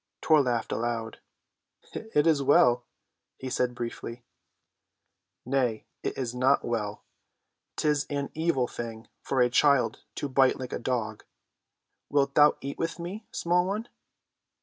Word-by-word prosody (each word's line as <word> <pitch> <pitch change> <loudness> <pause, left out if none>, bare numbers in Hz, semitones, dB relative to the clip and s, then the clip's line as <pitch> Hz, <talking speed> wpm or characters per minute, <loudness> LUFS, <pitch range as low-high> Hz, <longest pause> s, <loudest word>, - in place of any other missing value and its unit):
Tor 155 -2 +5
laughed 120 -4 -1
aloud. 115 -1 -2 0.7
"It 220 -10 0
is 155 -4 +4
well," 125 -3 +4 0.5
he 130 -1 -6
said 125 0 0
briefly. 120 0 -6 1.2
"Nay, 125 -4 0 0.2
it - - -3
is 125 -3 -2
not 130 +2 +2
well. 105 -3 -3 0.7
'Tis 150 -1 +1
an 140 -1 -3
evil 160 -6 +1
thing 115 -2 -7
for 135 -2 0
a 125 - +6
child 140 0 +3
to 145 - -3
bite 130 -1 +3
like 125 -1 -6
a - - -2
dog. 115 -4 -2 0.9
Wilt 140 -1 +2
thou 150 +1 +6
eat 140 +1 -6
with 165 0 -2
me, 185 +6 -7
small 175 +1 +1
one?" 210 +4 -3
130 Hz, 135 wpm, -28 LUFS, 120-150 Hz, 1.2 s, a